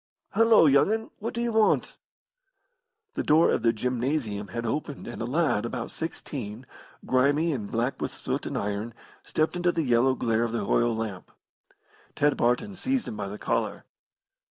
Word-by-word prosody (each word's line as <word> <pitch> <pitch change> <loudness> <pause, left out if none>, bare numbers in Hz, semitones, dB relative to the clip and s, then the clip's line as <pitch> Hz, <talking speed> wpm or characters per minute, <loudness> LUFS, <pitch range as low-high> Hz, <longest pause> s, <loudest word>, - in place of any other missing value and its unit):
Hullo, 225 -3 +6
young 140 +6 +5
'un, 220 0 -2
what 230 +3 -4
do 235 - -1
you 240 - 0
want?" 220 -1 +2 1.2
The - - -2
door 155 +2 +4
of - - +1
the 115 - +4
gymnasium 120 -2 -2
had 115 +6 -4
opened 145 +4 -3
and 120 - -7
a - - -1
lad, 145 -4 +1
about 120 - -4
sixteen, 130 -8 -6 0.4
grimy 145 +5 +2
and 105 -7 -4
black 120 +4 -1
with - - -2
soot - - -3
and - - -3
iron, 105 +3 -3 0.3
stepped 155 +2 0
into 175 0 +2
the 165 -2 -1
yellow 125 0 +3
glare 115 -2 0
of 115 -1 -1
the 110 -4 -1
oil 120 +2 +2
lamp. 110 -5 -5 0.9
Ted 145 0 +2
Barton 125 +13 +1
seized 260 +6 -1
him - - -5
by 100 -1 -4
the 100 +2 -6
collar. - - -2
130 Hz, 175 wpm, -27 LUFS, 115-165 Hz, 1.2 s, Hullo